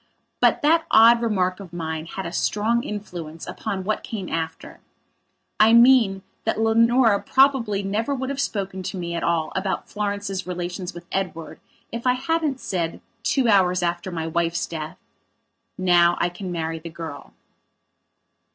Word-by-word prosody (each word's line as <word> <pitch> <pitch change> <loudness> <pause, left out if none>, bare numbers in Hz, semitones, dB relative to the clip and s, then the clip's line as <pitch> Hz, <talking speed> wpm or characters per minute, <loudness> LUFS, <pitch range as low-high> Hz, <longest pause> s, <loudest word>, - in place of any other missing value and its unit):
But - - +3
that 325 +2 +3
odd 230 +1 +7
remark 185 -5 0
of 190 -4 -10
mine 160 -2 -4
had 190 +3 -6
a 170 - -4
strong 225 +6 0
influence 175 -6 -7
upon 195 -3 -4
what 215 +3 -1
came 200 -5 -6
after. 160 0 -5 0.8
I 220 +2 +6
mean, 235 -5 +5 0.2
that 225 - -1
Leonora 230 0 +4
would - - -13
probably 260 -7 +3
never 220 +8 -1
have 270 +2 -2
spoken 195 -6 -3
to 185 +1 -5
me 170 -1 -4
at 170 - -2
all 165 -2 0
about 190 0 -2
Florence's 200 -2 -3
relations 180 0 -5
with 175 0 -9
Edward 165 -5 -4 0.3
if 235 +2 -4
I 250 - +5
hadn't 290 +1 -1
said, 170 -7 -3 0.2
two 265 +1 +1
hours 185 -4 +3
after 175 +2 -2
my 165 -3 -4
wife's 170 +1 -1
death: 155 -2 -6 0.8
"Now 175 -2 +4
I 175 - +1
can 180 +1 -7
marry 165 -1 -3
the 165 +1 -8
girl." 160 -3 -9
190 Hz, 155 wpm, -23 LUFS, 170-225 Hz, 0.8 s, odd